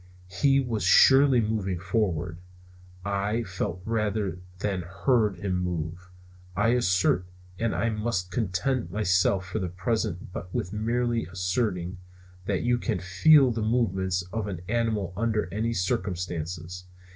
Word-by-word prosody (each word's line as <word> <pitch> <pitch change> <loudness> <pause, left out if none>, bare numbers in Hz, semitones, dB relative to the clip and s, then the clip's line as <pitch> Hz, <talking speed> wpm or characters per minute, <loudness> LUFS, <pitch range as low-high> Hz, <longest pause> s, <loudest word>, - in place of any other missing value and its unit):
He 140 +5 +3
was 120 -5 -2
surely 130 +8 +6
moving 105 -4 -1
forward. 90 -3 -1 0.7
I 100 +3 0
felt 90 -2 -4
rather 105 -4 -1 0.2
than 95 -1 -2
heard 100 +4 +1
him 90 0 -2
move. 90 0 -4 0.5
I 105 +4 +2
assert 95 -6 +2 0.3
and 115 -1 0
I 115 - +1
must 105 -4 -2
content 105 +1 -1
myself 95 -1 +2
for 95 +4 -3
the 95 -3 -2
present 90 -1 -2 0.2
with 105 -5 -3
merely 115 +1 0
asserting 90 0 -2 0.5
that 100 -3 0
you 120 0 +2
can - - -1
feel 125 - +5
the 115 -1 -2
movements 95 -5 0
of 110 -2 -2
an 90 -4 -5
animal 110 -5 0
under 110 +1 0
such 115 +2 -1
circumstances. 90 -1 -3
100 Hz, 130 wpm, -27 LUFS, 90-115 Hz, 0.7 s, surely